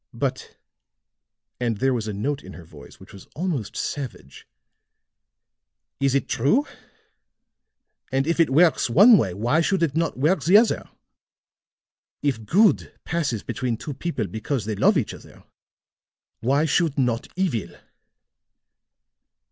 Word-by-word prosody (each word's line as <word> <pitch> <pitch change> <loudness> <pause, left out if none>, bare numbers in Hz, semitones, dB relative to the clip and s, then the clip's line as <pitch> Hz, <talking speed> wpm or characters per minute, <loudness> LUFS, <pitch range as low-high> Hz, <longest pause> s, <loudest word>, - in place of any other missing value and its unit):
But," - - -4 1.0
and 120 -3 -1
there 135 +4 +1
was 115 -3 -3
a - - -2
note 135 +8 -3
in 95 - -11
her 85 - -12
voice - - -15
which - - -15
was 100 - -13
almost 155 - -3
savage, 125 - -6 1.5
"is 135 -1 +1
it 140 - 0
true? 240 - +1 1.5
And 135 +1 +1
if 165 +2 -1
it 165 - +4
works 155 -1 +3
one 205 - +7
way, 95 - +1
why 120 - +1
should 185 +1 +1
it 155 -3 0
not 165 -4 -1
work 155 +8 +1
the 185 +5 +6
other? 225 +1 +1 1.3
If 125 -7 -1
good 205 +4 +3
passes 150 -10 -2
between 125 -3 -3
two 145 - -6
people 135 -4 -3
because 110 - -4
they 110 - -2
love 195 - +3
each 130 - -2
other, - - -15 1.0
why 140 +6 +1
should 160 -1 +1
not 120 -3 0
evil? 120 - -2
140 Hz, 135 wpm, -23 LUFS, 115-165 Hz, 1.5 s, one